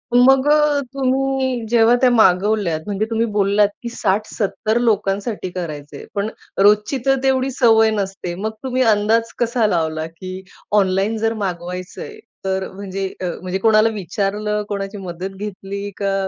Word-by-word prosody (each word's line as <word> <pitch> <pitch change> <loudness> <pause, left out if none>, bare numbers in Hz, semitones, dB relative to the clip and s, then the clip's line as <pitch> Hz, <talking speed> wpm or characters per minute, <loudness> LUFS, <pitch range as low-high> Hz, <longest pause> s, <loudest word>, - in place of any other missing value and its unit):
मग 265 +2 +5
अ, 300 -1 +4
तुम्ही 265 -2 0
जेव्हा 230 0 +5
त्या 255 - +6
मागवल्यात. 200 -5 +3
म्हणजे 205 +1 -1
तुम्ही 225 0 +1
बोललात, 205 0 +3 0.2
की 235 - -3
60-70 215 +1 -1
लोकांसाठी 205 -2 0
करायचंय. 150 -5 -7
पण 200 +1 -1 0.3
रोजची 210 +6 +4
तर 270 0 +4
तेवढी 265 0 +2
सवय 225 -4 +4
नसते. 195 -4 -3
मग 215 +4 -3
तुम्ही 260 -1 -1
अंदाज 225 +2 +1
कसा 235 -1 +2
लावला, 160 -4 -1
की 185 +3 -8 0.4
ऑनलाईन 195 +3 +1
जर 225 +1 0
मागवायचंय 185 - -5 0.3
तर 190 0 -1
म्हणजे 195 0 -4
अ, - - -2 0.2
म्हणजे 185 +1 -2
कोणाला 220 +1 +4
विचारलं? 210 +2 -2
कोणाची 200 0 -4
मदत 185 -1 -5
घेतली? 200 0 -5
का 200 -1 -1
210 Hz, 140 wpm, -20 LUFS, 190-230 Hz, 0.4 s, त्या